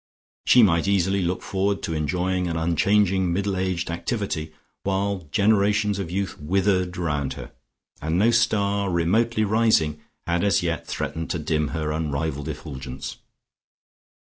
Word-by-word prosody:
She 125 - +7
might 85 -3 +3
easily 100 0 +2
look 90 +1 -2
forward 100 +1 -1
to 80 - -2
enjoying 90 +4 -1
an 85 -1 -2
unchanging 95 +2 +2
middle 100 +2 0
aged 95 -2 -1
activity, 85 -4 -3 0.3
while 95 -3 -1
generations 105 0 +2
of 95 -4 -4
youth 95 +2 -3
withered 90 +2 +1
round 75 -6 -1
her, - - -9 0.5
and 80 +3 0
no 110 +5 +4
star, 100 -4 +2
remotely 110 +7 +1
rising, 105 -9 +2 0.2
had 85 +1 0
as 100 -2 +2
yet 85 -3 -2
threatened 80 0 -4
to 85 - -1
dim 75 -1 0
her 75 0 -2
unrivalled 75 -2 -2
effulgence. 65 -1 -7
90 Hz, 140 wpm, -24 LUFS, 80-100 Hz, 0.5 s, She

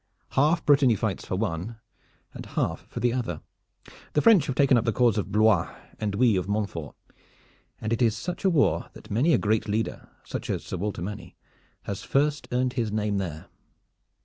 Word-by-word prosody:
Half 155 +5 +2
Brittany 140 -5 +5
fights 100 -2 -3
for - - -2
one, 100 +2 -3 0.6
and - - -8
half - - -2
for - - -6
the 120 -1 +1
other. 115 -11 -3 0.7
The 150 - +3
French 205 -10 +6
have 135 - -2
taken 140 -2 +4
up 115 - +3
the 115 - +1
cause 120 0 +3
of 100 - -4
Blois, 105 -4 +3 0.3
and 105 -2 -2
we 115 -1 +4
of 90 - -2
Montfort, 100 -7 -3 0.8
and 110 +1 -2
it 115 - -1
is 115 -3 +3
such 180 - -5
a 195 - +4
war 160 -6 +2
that - - -13
many 125 +11 +3
a - - +5
great 110 +1 0
leader, 110 +2 -2
such - - -6
as - - -2
Sir - - -5
Walter 95 -2 -3
Manny, 100 +2 -7 0.5
has 100 - -5
first 145 +2 0
earned 125 0 0
his 115 -4 -1
name 105 -1 0
there. 80 -5 -5
110 Hz, 190 wpm, -26 LUFS, 100-130 Hz, 0.8 s, French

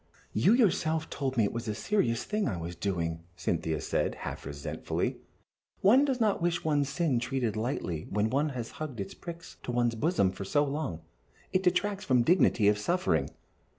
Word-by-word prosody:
"You 115 - +4
yourself 160 -9 +2
told 135 -2 -2
me 115 - +5
it 100 - 0
was 115 0 -4
a 105 - -1
serious 120 - +1
thing 210 0 -1
I 100 -8 -2
was 85 +1 -5
doing," 85 -3 -2
Cynthia 80 -3 -1
said, - - -1
half - - -5
resentfully. 70 0 -3 0.6
"One 250 +9 +6
does 265 -3 0
not 215 -5 +2
wish 175 0 0
one's 145 -3 +1
sin 145 -5 +1
treated 120 -2 -1
lightly 110 - -2
when 105 +2 0
one 145 +3 +2
has 120 -4 -5
hugged 140 -7 -4
its 95 -1 -4
pricks 170 -1 -9
to - - -4
one's 120 -1 +2
bosom 115 - +2
for 95 +1 -6
so 145 +10 +2
long 140 - -3 0.5
it 185 - +3
detracts 195 +2 +1
from 125 -2 +3
the - - -9
dignity 160 - +4
of 105 0 +4
suffering." 180 - +1
130 Hz, 185 wpm, -30 LUFS, 105-170 Hz, 0.6 s, One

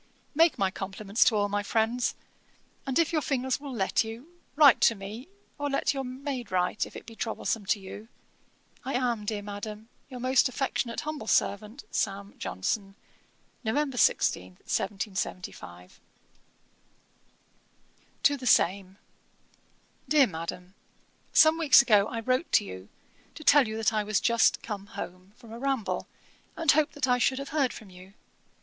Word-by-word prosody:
'Make 325 +2 +4
my 190 -1 +1
compliments 195 +3 0
to 225 - +3
all 205 -1 +2
my 205 0 -1
friends; 225 +3 0 0.7
and, 265 - 0
if 335 -1 +2
your 310 - +2
fingers 260 -2 -1
will 280 -1 -8
let 215 -4 +1
you, 230 +10 -9 0.2
write 285 -4 +7
to 230 - +5
me, 210 +7 -8 0.3
or 290 0 -1
let 275 - +1
your 270 -1 -3
maid 255 -3 -5
write, 180 +2 0
if - - -16
it - - -9
be 225 -1 -11
troublesome 225 -2 -3
to 205 +1 +1
you. 200 +3 -10 0.8
I 265 0 -3
am, 240 -4 -1
dear 205 -1 -3
Madam, 210 +2 -7 0.2
'Your 255 -2 -8
most 255 +1 +3
affectionate 255 -2 -2
humble 300 -7 -5
servant, 215 +7 0
'SAM. 200 0 -2
JOHNSON.' 195 - -3 0.7
'November 270 +4 -1
16, 90 - +2
1775.' 185 - -5 2.2
TO 285 - +4
THE 255 -2 -6
SAME. 190 -1 +2 1.1
'DEAR 300 -3 +6
MADAM, 180 0 -6 0.6
'Some 315 +1 +5
weeks 295 -4 +7
ago 210 -5 +4
I 230 - -4
wrote 255 +7 0
to - - +5
you, 95 0 -9 0.5
to 310 - -9
tell 285 -4 +6
you 220 0 -4
that 225 0 +1
I 215 -1 +1
was 210 -1 +1
just 235 -2 +2
come 200 -3 -6
home 185 -2 -8
from 235 -3 -15
a 230 - -8
ramble, 270 -5 -2 0.5
and 325 -4 +4
hoped 305 +1 +2
that 275 -3 -1
I 250 0 +3
should 260 +2 +2
have 275 +1 -5
heard 280 -4 +1
from 210 -4 -11
you. 185 +2 -14
225 Hz, 155 wpm, -28 LUFS, 200-270 Hz, 2.2 s, write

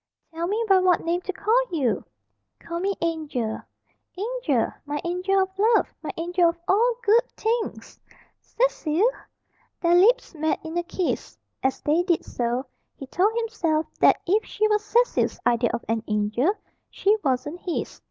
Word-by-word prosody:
"Tell 335 +1 -2
me 435 +4 0
by 385 -2 +6
what 365 -2 +2
name 345 +2 0
to 385 - -4
call 435 +6 +2
you!" 280 -9 0 0.6
"Call 335 0 -5
me 390 +2 -1
Angel." 305 -9 -2 0.6
"Angel! 400 - 0
My 295 0 -3
angel 365 +3 0
of 380 - -5
love! 450 +2 +3
My - - -6
angel 345 +1 +2
of 335 - -4
all 465 +5 +3
good 460 +3 +3
things!" 455 +1 -2 0.4
"Cecil!" 410 -6 +1 0.7
Their 340 0 +2
lips 420 +8 +4
met 315 -1 -1
in 320 +1 -6
a 345 - +1
kiss. 370 0 -3 0.2
As 265 0 0
they 310 +4 +2
did 350 -2 0
so, 245 +2 -2 0.3
he 270 - -8
told 375 +10 +1
himself 330 -9 0
that - - +5
if 415 +5 +2
she 430 +1 0
was 425 0 +2
Cecil's 475 +3 +1
idea 235 0 +3
of - - -4
an 225 0 0
angel, 215 - +1 0.4
she 410 +2 +2
wasn't 275 +4 -1
his. 355 -2 -4
350 Hz, 160 wpm, -24 LUFS, 300-420 Hz, 0.7 s, by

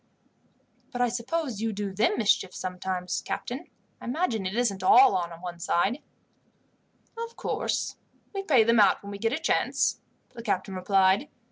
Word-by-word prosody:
"But 245 - -5
I 245 -1 +3
suppose 245 0 -3
you 225 0 0
do 200 -2 -4
them 210 - +2
mischief 200 -4 +1
sometimes, 180 -1 -3
captain. 245 - -5 0.3
I - - -9
imagine 240 - -1
it 190 - -4
isn't 225 -6 0
all 250 +8 +7
one 175 -1 -4
side." 195 - 0 1.1
"Of 465 0 -6
course, - - -2 0.4
we 395 - -2
pay 275 - +4
them 230 0 +3
out 200 -1 +4
when 200 - -7
we 200 - -7
get 225 +2 0
a 270 - 0
chance," 320 - +1 0.3
the 235 - -8
captain 195 -3 -2
replied. 190 +6 +2
210 Hz, 155 wpm, -27 LUFS, 190-245 Hz, 1.1 s, all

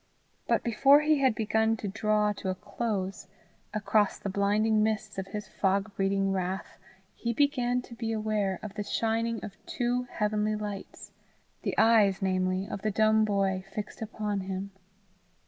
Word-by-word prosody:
But - - +2
before 275 +6 +5
he 305 -1 +3
had 260 -4 +3
begun 220 +1 +1
to 210 - -5
draw 210 0 +1
to 195 - -5
a 185 - -1
close, 195 -2 -3 0.4
across 210 -1 +1
the 195 - -4
blinding 210 +2 +2
mists 215 -2 -1
of 190 - -4
his 210 0 -6
fog 200 +1 0
breeding 195 0 +1
wrath 190 0 -3 0.3
he 235 0 -2
began 250 -2 +1
to 240 - -12
be 230 -1 -3
aware 215 -3 0
of 210 -2 -6
the 210 - -4
shining 230 +2 -1
of 200 - -11
two 245 +1 -1
heavenly 210 0 0
lights, 210 -2 -7 0.5
the - - -3
eyes, 210 -4 +5
namely, 185 0 0
of 195 - -5
the 215 - 0
dumb 215 +1 +3
boy 195 -2 0
fixed 210 +1 -5
upon 210 -2 -2
him. 190 +1 -4
210 Hz, 160 wpm, -29 LUFS, 195-225 Hz, 0.5 s, before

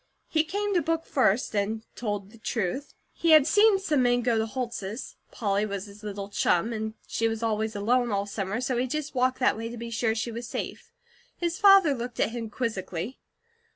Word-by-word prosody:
He 315 -1 +3
came 405 +5 -2
to 355 - +3
book 330 0 -1
first, 245 -3 +1
and 215 +2 -1
told 205 -3 -3
the 230 - -16
truth. 230 +4 -3 0.2
He 330 -1 +3
had 305 -3 +8
seen 420 +2 +5
some 315 -8 +1
men 245 -1 +3
go 240 0 +2
to 225 - +2
the 220 - +1
Holts'. 235 -3 -5
Polly 200 -2 0
was 200 -2 -3
his 205 0 -13
little 200 -2 -5
chum; 205 +2 +1
and 220 0 -4
she 225 - 0
was 225 0 -3
always 220 0 0
alone 240 +4 +2
all 200 0 0
summer, 200 +2 -3
so 255 -1 -1
he 250 +2 +1
just 300 +2 -3
walked 255 0 +2
that 255 - +3
way 225 +1 -4
to 240 - -7
be 235 0 -6
sure 225 -1 +1
she 230 +1 -2
was 235 +1 -6
safe. - - -5 0.5
His 340 -1 -2
father 390 -7 +7
looked 245 -1 -6
at - - +2
him 230 -2 -5
quizzically. 215 -2 -4
230 Hz, 210 wpm, -27 LUFS, 215-260 Hz, 0.5 s, had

